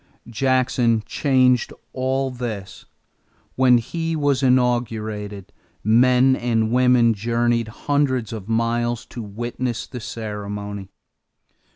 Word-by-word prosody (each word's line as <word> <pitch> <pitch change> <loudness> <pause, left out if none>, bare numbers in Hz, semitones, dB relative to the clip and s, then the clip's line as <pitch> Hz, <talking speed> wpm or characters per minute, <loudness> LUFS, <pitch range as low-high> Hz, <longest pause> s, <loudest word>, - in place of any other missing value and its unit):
Jackson 125 -2 +1
changed 130 -3 +2 0.2
all 130 +1 -1
this. 110 -7 -6 0.7
When 130 -2 +5
he 165 +7 -3
was 145 -3 +1
inaugurated, 110 -6 0 0.3
men 125 +4 +4
and 115 -3 0
women 125 -2 +4
journeyed 115 +2 0
hundreds 130 -1 -1
of 105 -1 -7
miles 120 +1 0
to 120 - -8
witness 120 +3 -4
the 125 - -8
ceremony. 105 -3 -6
120 Hz, 95 wpm, -22 LUFS, 110-130 Hz, 0.7 s, When